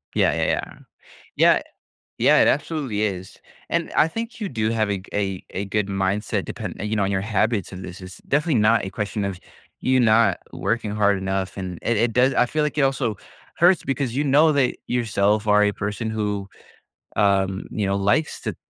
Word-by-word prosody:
Yeah, - - +3
yeah, - - -1
yeah. - - -2 0.6
Yeah - - +5 0.6
Yeah, - - +5
it - - +5
absolutely 145 -7 -1
is, 95 -3 -3 0.3
and - - -1
I 155 - +4
think 230 +7 -6
you 210 - -2
do 110 - -1
have 110 -2 0
a 100 - 0
g 95 - -16
a 95 -2 -2
a 100 - -4
good 105 +1 -1
mindset 95 +1 -1
depend - - -6
you 105 +1 -2
know, 105 - +1
on 100 - 0
your 95 -1 0
habits 105 -1 0
this 90 -1 -8
is 90 0 -11
definitely 145 -4 +2
not 110 0 +3
a - - -4
question 105 0 -3
of 95 -2 -4 0.4
you 130 0 +2
not 110 -5 +4 0.2
working 115 -2 -2
hard 100 -1 +2
enough, 95 0 -3
and 90 -2 -5
it 115 - 0
it 115 +1 +1
does 125 +3 +3
I 125 - +3
feel 155 +5 -1
like 150 -1 -2
it - - +3
also 135 -5 0 0.4
hurts 175 +1 +4
because 135 -3 -2
you 145 - +1
know 150 +3 +4
that 135 -3 +2
yourself 105 -3 +1
are 105 0 +5
a 105 0 +2
person 105 +3 -3
who, 105 -2 -2 0.7
um, 95 -1 +1
you 105 -2 -2
know, 95 - 0
um, 100 - -1
likes 150 +11 +1
to - - -3
105 Hz, 200 wpm, -23 LUFS, 100-125 Hz, 0.7 s, Yeah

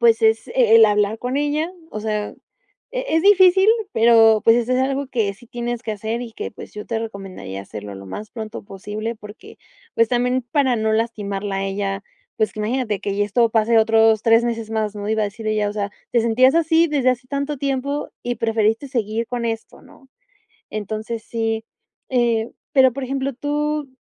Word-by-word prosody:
pues 230 -1 +4
es, 220 0 +3
eh, - - -8
e 230 -3 +5
el 225 - +9
hablar 210 +1 +2
con 250 +2 -3
ella, 295 +4 0 0.2
o 215 - -5
sea, 210 -1 -2 0.6
e - - -2
es 325 - +2
difícil, 380 -1 +6 0.3
pero, 225 -1 +5
pues, 225 - +7
eso 240 +1 0
es 255 - +2
algo 270 +1 -1
que 220 -6 -1
sí 240 +4 -18
tienes 240 0 -4
que 230 - -4
hacer 220 +3 -3
y 235 -2 -8
que, - - -5
pues - - -11
yo 210 - -7
te 225 -1 -2
recomendaría 195 - -7
hacerlo 105 0 -8
lo 95 0 -10
más 210 - -7
pronto 220 -1 -7
posible 210 +4 -5
porque, 215 - -13 0.4
pues 230 -1 +3
también 250 +1 +1
para 255 0 +1
no 220 0 0
lastimarla 205 -3 -2
a 195 - -2
ella, 195 0 -3 0.3
pues 215 0 -1
imagínate 215 -1 -1
que 200 -1 -3
ya 205 - +2
esto 230 +3 +2
pase 225 +1 +3
otros 220 -1 +4
3 230 +1 +4
meses 230 -2 -3
más 215 -2 -1
¿no? 205 0 -5
Iba 220 0 +1
a - - +2
decir 215 +2 -8
ella, 210 -1 +1
o - - -4
sea, 205 -1 -3 0.2
te 235 - +4
sentías 245 +4 +4
así 330 0 +4
desde 275 -4 +2
hace 255 0 -3
tanto 280 +1 -2
tiempo 280 +1 -2
y 245 0 -2
preferiste 225 +3 +1
seguir 230 -3 -2
con 240 0 -3
esto 225 -1 -5
¿no? 270 - -19 0.6
Entonces 215 +2 -4
sí, 225 -1 -2 0.5
eh, 235 -3 +1 0.2
pero, 260 -3 +5
por 275 +1 -4
ejemplo, 270 +1 -2
tú 295 +2 -2
225 Hz, 195 wpm, -21 LUFS, 215-255 Hz, 0.6 s, el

